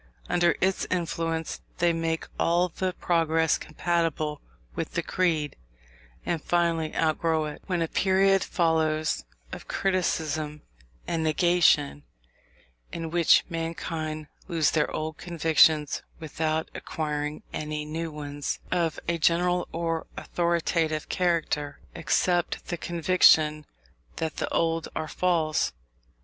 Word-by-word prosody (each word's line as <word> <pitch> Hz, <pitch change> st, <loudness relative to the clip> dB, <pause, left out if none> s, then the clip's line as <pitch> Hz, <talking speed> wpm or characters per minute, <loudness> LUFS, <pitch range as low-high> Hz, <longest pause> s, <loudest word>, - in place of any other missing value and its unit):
Under 175 Hz, -1 st, +3 dB
its 190 Hz, 0 st, +1 dB
influence 165 Hz, -2 st, -2 dB, 0.2 s
they 175 Hz, -1 st, +3 dB
make 165 Hz, 0 st, -1 dB
all 175 Hz, +2 st, +2 dB
the 185 Hz, +2 st, -2 dB
progress 165 Hz, -2 st, +2 dB
compatible 155 Hz, -2 st, -1 dB, 0.3 s
with -, -, -4 dB
the -, -, 0 dB
creed, 160 Hz, -6 st, 0 dB, 0.7 s
and 170 Hz, -3 st, -1 dB
finally 170 Hz, -2 st, +1 dB
outgrow 160 Hz, 0 st, +1 dB
it; 150 Hz, -, -7 dB
when 175 Hz, -3 st, 0 dB
a -, -, -1 dB
period 195 Hz, +2 st, +3 dB
follows 160 Hz, -2 st, +1 dB, 0.3 s
of -, -, -8 dB
criticism 160 Hz, -5 st, -1 dB, 0.4 s
and 165 Hz, -1 st, -1 dB
negation, 155 Hz, -, +3 dB, 0.9 s
in 165 Hz, -1 st, -5 dB
which 170 Hz, -1 st, +5 dB
mankind 165 Hz, -2 st, -4 dB, 0.2 s
lose 165 Hz, -3 st, +2 dB
their 150 Hz, -2 st, +1 dB
old 155 Hz, 0 st, -4 dB
convictions 160 Hz, -3 st, +3 dB, 0.2 s
without 160 Hz, 0 st, -2 dB
acquiring 150 Hz, -1 st, -3 dB
any 150 Hz, 0 st, -3 dB
new 160 Hz, +2 st, -4 dB
ones, 145 Hz, -1 st, -4 dB
of 170 Hz, -3 st, 0 dB
a 170 Hz, 0 st, 0 dB
general 175 Hz, +2 st, +2 dB
or 165 Hz, -1 st, -2 dB
authoritative 170 Hz, -2 st, 0 dB
character, 160 Hz, -5 st, 0 dB
except 175 Hz, +2 st, 0 dB
the 175 Hz, -, -1 dB
conviction 160 Hz, -3 st, +4 dB, 0.5 s
that 160 Hz, -2 st, -3 dB
the -, -, -2 dB
old 165 Hz, -1 st, +1 dB
are 155 Hz, -, -2 dB
false. 160 Hz, -, +1 dB
165 Hz, 115 wpm, -27 LUFS, 155-175 Hz, 0.9 s, which